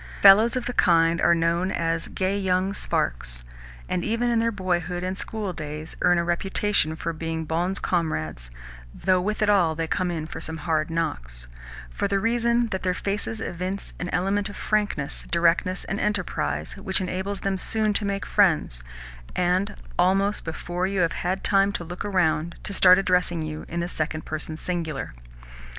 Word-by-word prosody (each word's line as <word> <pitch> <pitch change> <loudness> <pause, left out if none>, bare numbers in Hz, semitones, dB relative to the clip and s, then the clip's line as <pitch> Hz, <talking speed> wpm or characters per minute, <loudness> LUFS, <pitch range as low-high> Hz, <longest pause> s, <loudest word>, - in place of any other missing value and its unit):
Fellows 210 +5 +7
of 250 -1 -2
the 250 - -2
kind 165 -4 +4
are 170 - +5
known 170 +2 +1
as 165 0 -1
"gay 190 +1 -1
young 190 0 +1
sparks," - - -1 0.4
and, 175 - -1
even 230 +2 0
in 230 - +2
their 230 0 +1
boyhood 180 -3 -2
and 185 +1 -2
school 205 -1 -3
days, 155 -1 -6
earn 175 - +4
a 170 - +2
reputation 175 -1 0
for 165 +1 -3
being 160 0 -3
bons 175 +5 0
camarades 80 - -2 0.5
(though 185 -1 +2
with 210 +3 -1
it - - +2
all 175 -6 +4
they 165 +1 -1
come 185 +2 -1
in 160 -3 -3
for - - -7
some 160 0 -4
hard 155 -2 +1
knocks) - - -3 0.5
for - - -1
the 200 0 +1
reason 235 +2 +2
that 190 -2 -3
their 180 -1 0
faces 205 +3 -3
evince 185 -1 -4
an 180 - -3
element 195 +3 0
of 205 - -9
frankness, 205 -9 -1
directness, 175 +2 +2
and 195 - -3
enterprise 205 -4 -1
which 195 0 0
enables 190 +2 -3
them 195 -1 -1
soon 215 +2 +2
to 210 - -1
make 200 -1 -2
friends, 160 - +2 0.5
and, 180 +3 +1 0.2
almost 195 +3 +2
before 175 +3 -3
you 195 -1 0
have 170 - +2
had 185 +2 -2
time 195 0 +3
to 175 - -4
look 175 +2 -6
around, 170 -4 +1
to 200 - -4
start 185 -1 +7
addressing 180 -3 +2
you 155 0 -5
in 170 +1 -3
the 170 - -2
second 155 -2 -3
person 155 0 -4
singular. 165 -6 -3
180 Hz, 175 wpm, -25 LUFS, 165-200 Hz, 0.5 s, Fellows